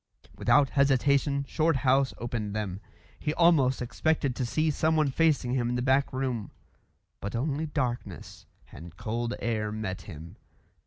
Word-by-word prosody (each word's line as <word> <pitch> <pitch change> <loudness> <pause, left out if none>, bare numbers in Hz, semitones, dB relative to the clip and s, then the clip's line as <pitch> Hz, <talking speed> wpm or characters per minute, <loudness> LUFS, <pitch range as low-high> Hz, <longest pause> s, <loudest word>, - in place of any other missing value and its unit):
Without 140 -2 +3
hesitation 140 +1 +2
Shorthouse 135 -4 +2
opened 115 -3 -4
them. 100 -3 -3 0.4
He 150 +1 -2
almost 140 -8 +4
expected 135 +2 0
to 125 -2 -2
see 155 +5 +1
someone 155 -1 +1
facing 145 -5 +2
him 120 -2 0
in 125 - -1
the 125 - -1
back 135 +1 +2
room; 130 -5 -2 0.7
but 100 +3 -5
only 145 +5 -1
darkness 130 -5 -4 0.2
and 85 0 -11
cold 115 +1 -3
air 110 -2 -1
met 105 -3 -4
him. 80 -2 -10
130 Hz, 140 wpm, -28 LUFS, 115-145 Hz, 0.7 s, almost